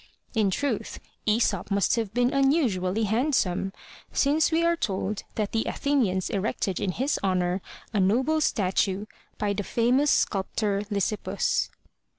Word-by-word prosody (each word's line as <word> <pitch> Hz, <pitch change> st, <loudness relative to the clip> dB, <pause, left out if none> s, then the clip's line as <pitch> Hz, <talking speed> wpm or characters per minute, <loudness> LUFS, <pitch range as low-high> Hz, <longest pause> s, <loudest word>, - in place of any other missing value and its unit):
In 215 Hz, -4 st, +2 dB
truth, 245 Hz, +4 st, -2 dB, 0.3 s
Aesop 215 Hz, 0 st, +1 dB
must 200 Hz, -2 st, +2 dB
have 225 Hz, -4 st, -2 dB
been 245 Hz, +4 st, +1 dB
unusually 235 Hz, -, +2 dB
hand 245 Hz, +8 st, +1 dB
some, 190 Hz, -1 st, 0 dB, 0.4 s
since 300 Hz, +4 st, +2 dB
we 325 Hz, +1 st, +2 dB
are 340 Hz, 0 st, +3 dB
told 200 Hz, -, -2 dB
that 210 Hz, -2 st, -1 dB
the 225 Hz, -, 0 dB
Athenians 225 Hz, -11 st, 0 dB
erected 195 Hz, -2 st, -1 dB
in 185 Hz, -, -1 dB
his 270 Hz, -, 0 dB
honor 185 Hz, -1 st, 0 dB, 0.3 s
a 210 Hz, -, +1 dB
noble 255 Hz, +12 st, +2 dB
statue, 195 Hz, -4 st, +1 dB, 0.3 s
by 205 Hz, -1 st, 0 dB
the 200 Hz, -, -2 dB
famous 245 Hz, +7 st, +2 dB
sculptor, 200 Hz, -1 st, +1 dB
Lysippus. 205 Hz, 0 st, 0 dB
215 Hz, 140 wpm, -26 LUFS, 195-265 Hz, 0.4 s, are